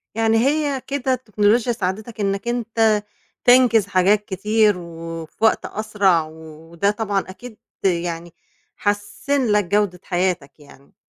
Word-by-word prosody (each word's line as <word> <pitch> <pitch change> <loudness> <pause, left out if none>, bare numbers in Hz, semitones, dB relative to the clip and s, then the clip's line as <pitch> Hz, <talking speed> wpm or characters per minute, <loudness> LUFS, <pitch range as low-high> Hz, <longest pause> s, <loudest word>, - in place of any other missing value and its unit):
يعني 225 0 +2
هي 280 +1 +1
كده 270 -2 -1
التكنولوجيا 225 0 +1
ساعدتك 215 +2 -4
إنّك 195 +2 -1
أنت 225 -3 +1 0.4
تنجز 245 -5 +5
حاجات 200 +2 +2
كتير 210 0 +2
وفي 165 +1 -8
وقت 220 - +2
أسرع 205 -6 +1
و 155 - -13 0.4
وده 200 +5 +1
طبعًا 205 -2 -1
أكيد 220 +3 -11 0.3
يعني 170 -2 -1 0.4
حسِّن 210 +6 -1
لك 210 0 +3
جودة 200 -1 0
حياتك 175 -6 -2
يعني. 140 -1 -18
205 Hz, 125 wpm, -21 LUFS, 180-225 Hz, 0.4 s, تنجز